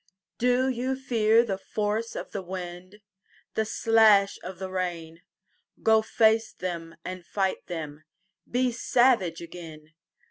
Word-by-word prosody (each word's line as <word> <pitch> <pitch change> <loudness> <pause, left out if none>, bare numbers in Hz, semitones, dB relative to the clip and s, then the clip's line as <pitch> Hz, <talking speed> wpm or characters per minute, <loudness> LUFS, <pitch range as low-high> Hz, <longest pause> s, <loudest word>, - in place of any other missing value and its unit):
DO 250 +2 +3
you 260 +1 -1
fear 230 -3 +3
the 195 -4 -3
force 215 +3 -2
of - - -6
the 200 - -4
wind, 185 +2 -8 0.5
The 220 - 0
slash 215 -2 +4
of 185 0 -7
the 190 +1 -6
rain? 170 -3 -4 0.6
Go 220 0 +5
face 220 0 +2
them 170 -2 -5
and 185 -1 -6
fight 190 +1 -2
them, 155 -3 -6 0.4
Be 250 +1 +1
savage 235 -8 +2
again. 160 -3 -11
195 Hz, 130 wpm, -27 LUFS, 175-225 Hz, 0.6 s, Go